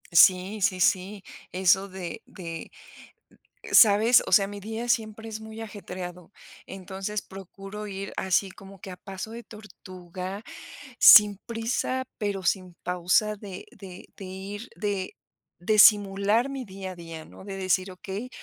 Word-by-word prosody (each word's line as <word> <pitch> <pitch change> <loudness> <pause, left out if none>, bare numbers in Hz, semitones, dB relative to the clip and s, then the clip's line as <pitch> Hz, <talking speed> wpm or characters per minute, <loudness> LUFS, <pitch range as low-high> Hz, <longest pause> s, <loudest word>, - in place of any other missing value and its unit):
Sí, 185 +5 +5
sí, 185 -1 +1
sí, 190 +2 +1 0.3
eso 190 +1 +3
de 185 -3 -7
de, 165 -3 -8 1.0
¿sabes? 220 +2 +6
O - - -6
sea, 195 -1 +5
mi 205 0 -8
día 225 +4 -5
siempre 225 -2 -1
es 220 0 -6
muy 220 0 -9
ajetreado. 180 -4 -8 0.3
Entonces 195 +2 -5
procuro 195 +2 -9
ir 195 -1 -6
así 190 +1 +1
como 195 0 -14
que - - -9
a 180 - -8
paso 195 +2 -8
de 235 +1 -8
tortuga, 185 -2 -9 0.6
sin 210 -2 +9
prisa, 235 +3 -2
pero 205 -3 -2
sin 185 0 -1
pausa 180 +4 +1
de 200 -3 -9
de 185 -2 -12
de 195 - -8
ir, 195 +5 -8
de 200 -3 -3 0.5
de 215 +5 +1
simular 205 +3 +5
mi 270 -2 -5
día 190 -1 -7
a - - -10
día, 165 -2 -9
¿no? - - -14
De 195 -1 -6
decir: 185 0 0
"Okey, 195 +6 -7
195 Hz, 145 wpm, -26 LUFS, 185-210 Hz, 1.0 s, sin